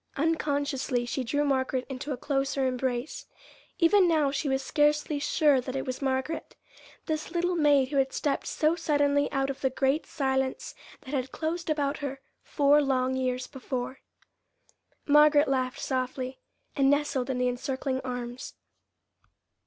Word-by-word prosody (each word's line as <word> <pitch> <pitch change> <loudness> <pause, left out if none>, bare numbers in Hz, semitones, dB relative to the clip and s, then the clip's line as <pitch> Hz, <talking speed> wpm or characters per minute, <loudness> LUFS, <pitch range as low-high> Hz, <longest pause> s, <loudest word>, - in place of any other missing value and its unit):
Unconsciously 285 -5 0
she 255 +2 -2
drew 290 +5 0
Margaret 260 -2 0
into 265 +2 -5
a 265 - -2
closer 275 0 -1
embrace. 255 +1 -2 0.5
Even 365 +2 +5
now 310 -4 +2
she 285 +1 -2
was 265 0 0
scarcely 295 +1 +1
sure 290 -2 +3
that 255 +1 -6
it 270 - -2
was 255 +1 -4
Margaret 265 +3 -2 0.5
this 310 -1 -3
little 350 +1 0
maid 290 -5 +3
who 285 - -2
had 270 -1 +2
stepped 285 - -1
so 310 +2 +1
suddenly 290 -3 +1
out 270 -1 0
of 270 - -10
the 265 - +2
great 270 +4 0
silence 265 -2 -1 0.3
that 260 - -9
had 260 -2 -2
closed 330 +1 -3
about 290 -1 0
her 275 -2 -4 0.2
four 290 0 +3
long 260 -2 +1
years 255 -1 -1
before. 260 -1 -5 1.1
Margaret 295 0 +6
laughed 260 -1 -1
softly, 255 0 -3 0.4
and 275 -1 +3
nestled 285 -2 +1
in 260 - -1
the 250 0 +1
encircling 260 +1 -2
arms. 245 -1 -6
275 Hz, 150 wpm, -28 LUFS, 260-295 Hz, 1.1 s, Margaret